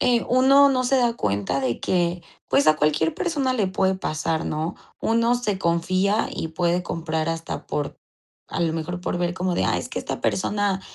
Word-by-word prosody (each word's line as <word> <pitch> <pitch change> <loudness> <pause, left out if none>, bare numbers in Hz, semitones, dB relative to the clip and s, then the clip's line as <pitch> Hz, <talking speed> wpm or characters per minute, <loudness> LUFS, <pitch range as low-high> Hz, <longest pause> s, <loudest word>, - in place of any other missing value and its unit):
eh, 245 -2 +2
uno 275 +3 +6
no 255 -2 +1
se 270 +2 +3
da 240 -2 +2
cuenta 100 +6 -1
de 125 -3 -1
que, 175 -1 0 0.3
pues, 140 - +3
a 155 0 +6
cualquier 155 +1 +1
persona 285 -7 0
le 215 -6 +1
puede 190 0 +1
pasar, 160 -2 -2
¿no? 155 +3 -2 0.3
Uno 230 +1 +2
se 215 -6 -1
confía 185 +4 +1
y 160 - -4
puede 175 +2 0
comprar 160 -2 -2
hasta 165 0 -4
por 145 - -3 0.5
a - - -4
lo 165 -2 +1
mejor, 165 +2 -4
por 180 - -2
ver 175 0 0
como 180 0 -1
de: - - +1
"Ah, - - +1
es - - -6
que - - -4
esta - - -5
persona 200 0 0
180 Hz, 195 wpm, -23 LUFS, 160-230 Hz, 0.5 s, uno